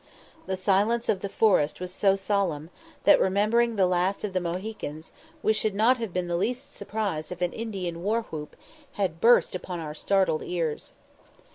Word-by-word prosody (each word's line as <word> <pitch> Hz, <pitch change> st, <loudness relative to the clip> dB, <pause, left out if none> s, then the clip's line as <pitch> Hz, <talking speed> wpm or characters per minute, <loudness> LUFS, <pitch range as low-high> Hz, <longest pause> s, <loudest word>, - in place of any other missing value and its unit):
The 190 Hz, 0 st, -2 dB
silence 205 Hz, +5 st, +1 dB
of 195 Hz, -, +2 dB
the 200 Hz, -, -4 dB
forest 190 Hz, -8 st, +2 dB
was 180 Hz, 0 st, -6 dB
so 195 Hz, 0 st, +3 dB
solemn, 190 Hz, -6 st, -1 dB, 0.3 s
that, 300 Hz, -, +6 dB
remembering 220 Hz, +5 st, +2 dB
the 195 Hz, -2 st, +4 dB
last 180 Hz, +2 st, 0 dB
of 205 Hz, -3 st, -3 dB
the 185 Hz, -, +1 dB
Mohicans, 175 Hz, -3 st, -5 dB, 0.3 s
we 215 Hz, -, +4 dB
should 215 Hz, -2 st, -1 dB
not 230 Hz, +5 st, +4 dB
have 225 Hz, -5 st, -4 dB
been 180 Hz, 0 st, -2 dB
the 175 Hz, -, -1 dB
least 250 Hz, +9 st, -2 dB
surprised 200 Hz, -7 st, -3 dB
if 180 Hz, -, -6 dB
an 175 Hz, -, 0 dB
Indian 190 Hz, -7 st, -4 dB
war 220 Hz, +5 st, 0 dB
whoop 150 Hz, -6 st, -8 dB, 0.4 s
had 180 Hz, -5 st, -2 dB
burst 240 Hz, +1 st, +5 dB
upon 180 Hz, -1 st, -5 dB
our 155 Hz, -2 st, -5 dB
startled 190 Hz, 0 st, +1 dB
ears. 165 Hz, -4 st, -3 dB
190 Hz, 175 wpm, -27 LUFS, 175-215 Hz, 0.4 s, that